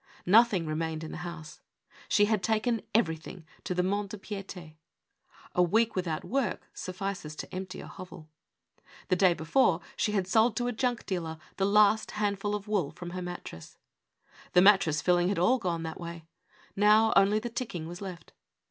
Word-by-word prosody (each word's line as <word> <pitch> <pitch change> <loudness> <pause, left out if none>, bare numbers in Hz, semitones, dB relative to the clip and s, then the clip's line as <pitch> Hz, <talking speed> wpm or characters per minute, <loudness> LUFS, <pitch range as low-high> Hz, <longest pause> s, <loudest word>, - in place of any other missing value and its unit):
Nothing 205 -2 +5
remained 160 0 -3
in 160 - -7
the - - -6
house. 170 -3 -8 0.5
She 205 - +4
had 215 -2 +1
taken 220 +3 0
every 180 -7 +2
thing 160 +1 -11 0.2
to 180 - -3
the 180 - +1
Mont 200 +2 -1
de 210 - -7
Pict(5. 195 -5 -8 0.8
A 180 - +3
week 220 +6 +2
without 175 -4 -2
work 260 -5 -2
suffi 195 +2 -4
ces 155 -5 -9
to - - -8
empty 185 0 -6
a - - -9
hovel. 180 -3 -11 0.8
The 185 - +4
day 180 -1 +4
before 165 +2 +2 0.2
she 210 - 0
had 195 -3 +1
sold 220 +4 +3
to 245 - -1
a 245 - 0
junk 245 0 -1
dealer 165 -4 -3 0.2
the 195 - +2
last 210 +1 +4
handful 205 0 -1
of 205 0 -6
wool 200 -9 0
from 175 +2 -9
her 185 +1 -5
mattress. 175 - -8 0.8
The 180 - +7
mattress 190 -7 +4
filling 175 0 +3
had 200 - -1
all 240 +10 +3
gone 170 -5 -2
that 160 0 -6
way; 170 -1 -8 0.5
now, 210 +2 +5
only 200 +2 +5
the 235 +2 -4
ticking 185 -10 -4
was 175 +3 -8
left. 185 -3 -8
190 Hz, 185 wpm, -29 LUFS, 170-210 Hz, 0.8 s, The